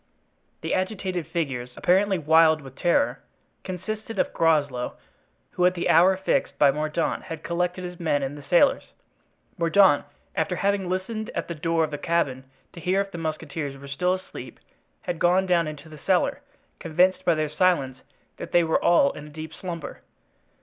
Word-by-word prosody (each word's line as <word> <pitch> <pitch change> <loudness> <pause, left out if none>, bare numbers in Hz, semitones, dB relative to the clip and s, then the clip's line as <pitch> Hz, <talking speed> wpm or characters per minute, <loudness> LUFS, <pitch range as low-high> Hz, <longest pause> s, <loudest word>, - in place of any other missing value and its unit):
The - - -2
agitated 185 -4 -2
figures, 130 -7 -3
apparently 190 +2 +3
wild 160 0 +4
with 135 -1 -12
terror, 285 - +1 0.4
consisted 210 +4 -5
of - - 0
Groslow, 145 -7 +1 0.5
who 180 - -1
at 180 - 0
the 175 - -1
hour 180 +3 +5
fixed 190 - -1
by 140 -2 +5
Mordaunt 155 +3 -1
had 165 - -7
collected 180 +1 -2
his 180 0 -7
men 145 -4 0
and 135 +2 -4
the 145 - -9
sailors. 175 - +2 0.7
Mordaunt, 170 -2 +4 0.3
after 185 - 0
having 195 -1 0
listened 215 +4 -3
at - - -2
the 170 - -4
door 165 +1 0
of 155 - -2
the 145 - -4
cabin 145 -6 -1 0.3
to 175 - -10
hear 185 +3 +1
if 200 0 -2
the 175 - -6
musketeers 155 -3 -4
were 140 +1 -11
still 180 +7 0
asleep, 185 - -10 0.4
had 175 -2 -4
gone 180 +2 +3
down 175 -3 +2
into 155 0 -8
the 155 -1 -12
cellar, - - +1 0.4
convinced 185 +3 +2
by 170 - +3
their 155 0 0
silence 150 -5 +1 0.4
that - - -8
they 175 - +5
were 160 -1 +1
all 170 -5 +5
in 150 - -10
a - - -11
deep 155 +1 -8
slumber. 170 -3 -7
170 Hz, 175 wpm, -25 LUFS, 150-185 Hz, 0.7 s, hour